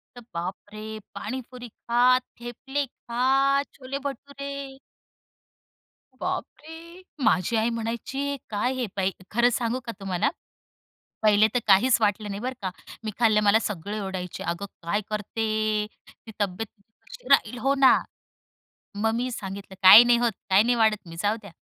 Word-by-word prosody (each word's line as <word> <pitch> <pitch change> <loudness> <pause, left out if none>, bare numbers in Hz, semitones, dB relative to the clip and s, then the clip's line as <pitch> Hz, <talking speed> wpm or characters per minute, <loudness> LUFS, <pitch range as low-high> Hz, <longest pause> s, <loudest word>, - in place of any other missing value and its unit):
तर 245 - -10
बापरे! 215 +5 -6
पाणीपुरी 250 +1 -6
खा, 245 +3 +3 0.2
थेपले 270 +4 -4
खा, 270 +3 +1
छोले 265 +1 -6
भटुरे. 280 -1 -7 1.4
बापरे! 330 +4 -6 0.2
माझी 185 +5 +2
आई 220 +1 +2
म्हणायची 235 +5 -3
"काय 215 +4 0
हे 255 -2 -2
बाई?" 195 -1 +1 0.2
खरं 240 +2 +4
सांगू 240 +2 -1
का 230 - -3
तुम्हाला. 195 +7 0 0.9
पहिले 215 0 +5
तर 245 - +2
काहीच 225 +6 +5
वाटलं 210 0 +1
नाही 200 0 -4
बरं 255 +1 -3
का. 190 - -2 0.3
मी 215 - -3
खाल्लं. 215 -3 +4
मला 210 +2 +5
सगळे 205 +1 -4
ओरडायचे 185 -2 -5
"अगं 170 +4 -3 0.2
काय 205 +5 0
करते? 215 +1 -3 0.6
ती 220 - -15
तब्येत 200 +3 -2
बघ 200 - -31 0.2
कशी - - -12
होऊन - - -10
राहीली?" 250 - +4
हो 270 +3 +1
ना. 270 -2 +6 1.0
मग 220 +2 +1
मी 250 +2 -1
सांगितलं 195 -3 -7
"काही 205 +5 +11
नाही 240 0 +4
होत. 240 -1 +1 0.2
काही 190 +2 +6
नाही 240 +2 +2
वाढत 215 -4 +2
मी. 165 - -9
जाऊ 205 +1 +1
द्या. 200 - -11
230 Hz, 150 wpm, -25 LUFS, 205-255 Hz, 1.4 s, काही